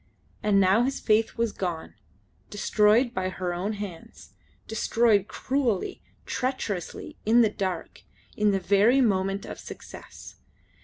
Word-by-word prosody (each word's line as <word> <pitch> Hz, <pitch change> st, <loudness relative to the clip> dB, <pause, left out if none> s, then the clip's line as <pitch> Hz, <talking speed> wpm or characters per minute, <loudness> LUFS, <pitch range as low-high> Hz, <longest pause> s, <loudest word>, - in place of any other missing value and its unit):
And 205 Hz, -2 st, +3 dB
now 195 Hz, +4 st, +4 dB
his 270 Hz, +2 st, -1 dB
faith 220 Hz, +1 st, +1 dB
was 230 Hz, -1 st, +1 dB
gone, 175 Hz, -5 st, -4 dB, 0.6 s
destroyed 215 Hz, +3 st, +3 dB
by 185 Hz, -4 st, -1 dB
her 185 Hz, -1 st, -3 dB
own 190 Hz, +5 st, -2 dB
hands; 200 Hz, -5 st, -9 dB, 0.3 s
destroyed 220 Hz, -2 st, +2 dB
cruelly, 255 Hz, -8 st, -1 dB, 0.2 s
treacherously, 240 Hz, -9 st, -4 dB
in 230 Hz, +3 st, +5 dB
the 220 Hz, -3 st, +3 dB
dark; 185 Hz, -5 st, -4 dB, 0.3 s
in 210 Hz, 0 st, +2 dB
the 195 Hz, -1 st, +1 dB
very 205 Hz, +7 st, +4 dB
moment 195 Hz, -4 st, +1 dB
of -, -, -8 dB
success. -, -, -11 dB
210 Hz, 125 wpm, -26 LUFS, 190-230 Hz, 0.6 s, in